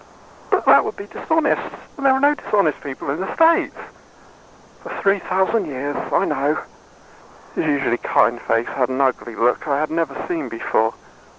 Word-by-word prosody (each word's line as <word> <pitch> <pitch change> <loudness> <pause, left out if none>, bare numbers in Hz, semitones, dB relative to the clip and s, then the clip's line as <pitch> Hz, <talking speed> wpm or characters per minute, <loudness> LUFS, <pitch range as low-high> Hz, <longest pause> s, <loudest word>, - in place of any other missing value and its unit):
"But - - +1
that - - +7
would - - -4
be 200 - -8
dishonest. 320 +9 0 0.3
And 280 - -8
there 270 -1 +5
are 265 - +1
no 285 +2 +4
dishonest 200 - 0
people 140 0 -5
in 145 - -3
the 190 - -3
State." 330 0 +4 1.1
"For - - -10
three 200 0 +2
thousand 190 +2 0
years. 145 +1 -4 0.2
I - - +2
know." 145 +1 0 1.0
His - - -1
usually 135 -5 +1
kind 120 +2 +2
face 115 +1 0
had 130 -2 -1
an 130 +1 -2
ugly 130 -4 0
look 120 +6 +1
I 140 -1 +1
had 155 +1 -2
never 160 -4 -1
seen 335 -3 -3
before. - - 0
150 Hz, 175 wpm, -21 LUFS, 135-205 Hz, 1.1 s, that